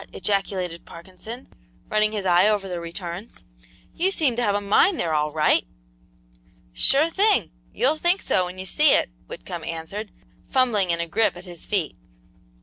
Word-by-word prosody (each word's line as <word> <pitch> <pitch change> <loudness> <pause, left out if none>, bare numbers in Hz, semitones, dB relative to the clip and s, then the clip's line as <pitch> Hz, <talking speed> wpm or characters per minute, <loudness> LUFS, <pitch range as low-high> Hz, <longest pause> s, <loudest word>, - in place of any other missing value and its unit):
ejaculated 190 -4 -2
Parkinson, 190 +8 -10 0.4
running 215 0 +2
his 210 -3 -4
eye 180 +2 +5
over 205 -2 0
the 180 -2 -4
returns. 170 +4 -8 0.5
"You 365 +3 +1
seem 290 -10 +1
to 245 - -1
have 205 -4 +1
a - - +1
mine 210 - +3
there, 165 -2 -1
all 150 0 +1
right!" 150 0 +3 1.1
"Sure 285 - +3
thing! 405 +3 +3 0.2
You'll 290 +5 +1
think 345 +4 +1
so 185 - +2
when 180 +1 -8
you 185 - -5
see 300 +8 +4
it," - - +2 0.2
Whitcomb - - -7
answered, 170 +6 -5 0.4
fumbling 235 -8 +2
in 170 0 +1
a 170 - -2
grip 205 +1 +1
at 180 - -11
his 175 -2 -8
feet. 185 -7 -1
195 Hz, 165 wpm, -24 LUFS, 175-240 Hz, 1.1 s, eye